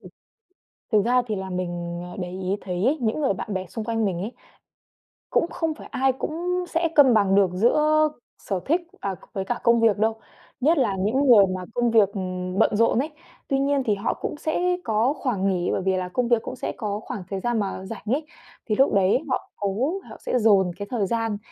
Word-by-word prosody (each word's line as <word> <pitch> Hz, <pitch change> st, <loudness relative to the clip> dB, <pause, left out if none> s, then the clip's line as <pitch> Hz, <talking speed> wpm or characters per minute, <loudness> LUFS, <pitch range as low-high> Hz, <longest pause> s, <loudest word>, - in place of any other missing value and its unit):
Ừm. -, -, -12 dB, 0.8 s
Thực 210 Hz, -3 st, +3 dB
ra 250 Hz, +1 st, +4 dB
thì 215 Hz, -, -1 dB
là 190 Hz, 0 st, -5 dB
mình, 175 Hz, -1 st, -4 dB
ờ, -, -, -10 dB
để 180 Hz, -1 st, -4 dB
ý 185 Hz, +1 st, -2 dB
thấy 180 Hz, +2 st, -2 dB
ấy, 290 Hz, +5 st, +3 dB
những 230 Hz, +6 st, 0 dB
người 270 Hz, -, +2 dB
bạn 200 Hz, +2 st, -5 dB
bè 190 Hz, 0 st, -2 dB
xung 220 Hz, +2 st, -6 dB
quanh 225 Hz, -1 st, 0 dB
mình 180 Hz, -3 st, -1 dB
ấy, 215 Hz, +5 st, -4 dB, 1.0 s
cũng -, -, +2 dB
không 325 Hz, -2 st, -1 dB
phải -, -, -12 dB
ai 265 Hz, +1 st, +2 dB
cũng 355 Hz, +6 st, -2 dB
sẽ 330 Hz, 0 st, +1 dB
cân 275 Hz, -4 st, +7 dB
bằng 200 Hz, -3 st, +3 dB
được 195 Hz, -3 st, +4 dB
giữa 305 Hz, +9 st, +3 dB, 0.3 s
sở 195 Hz, -3 st, -3 dB
thích, 335 Hz, +5 st, +2 dB, 0.2 s
à, 195 Hz, -2 st, -3 dB, 0.2 s
với 190 Hz, -1 st, -3 dB
cả 240 Hz, +2 st, -2 dB
công 235 Hz, 0 st, +5 dB
việc 225 Hz, -3 st, +4 dB
đâu, 220 Hz, +1 st, 0 dB, 0.4 s
nhất 315 Hz, +6 st, +3 dB
là 225 Hz, -8 st, +2 dB
những 240 Hz, +9 st, +1 dB
người 215 Hz, -6 st, +8 dB
mà 185 Hz, -, -5 dB
công 240 Hz, -1 st, +1 dB
việc, 215 Hz, -4 st, +5 dB
ừm, 185 Hz, -1 st, -4 dB
bận 215 Hz, -, +3 dB
rộn 230 Hz, +2 st, +3 dB
ấy. 300 Hz, +4 st, -1 dB, 0.4 s
Tuy 270 Hz, 0 st, +1 dB
nhiên 275 Hz, 0 st, +1 dB
thì 210 Hz, -2 st, +2 dB
họ 200 Hz, -, -1 dB
cũng -, -, -3 dB
sẽ 355 Hz, +4 st, 0 dB
có 225 Hz, +4 st, +1 dB
khoảng 225 Hz, -10 st, -1 dB
nghỉ, 180 Hz, -2 st, 0 dB
bởi -, -, 0 dB
vì 190 Hz, -1 st, +2 dB
là 180 Hz, -1 st, -3 dB
công 245 Hz, +6 st, 0 dB
việc 235 Hz, -2 st, +3 dB
cũng -, -, -6 dB
sẽ -, -, -3 dB
có 210 Hz, -2 st, -3 dB
khoảng 220 Hz, -4 st, -6 dB
thời 195 Hz, -, -3 dB
gian 240 Hz, +2 st, 0 dB
mà 190 Hz, -1 st, -3 dB
rảnh 215 Hz, +1 st, -7 dB
ấy, 275 Hz, +8 st, 0 dB, 0.4 s
thì 215 Hz, -, 0 dB
lúc 270 Hz, 0 st, +3 dB
đấy 195 Hz, +4 st, +4 dB
họ 255 Hz, -, -2 dB
cố 210 Hz, -, -1 dB, 0.2 s
họ -, -, -10 dB
sẽ 250 Hz, -, 0 dB
dồn 200 Hz, -5 st, +4 dB
cái 200 Hz, 0 st, -5 dB
thời 230 Hz, -5 st, 0 dB
gian 225 Hz, -2 st, -1 dB
220 Hz, 230 wpm, -24 LUFS, 190-260 Hz, 1.0 s, người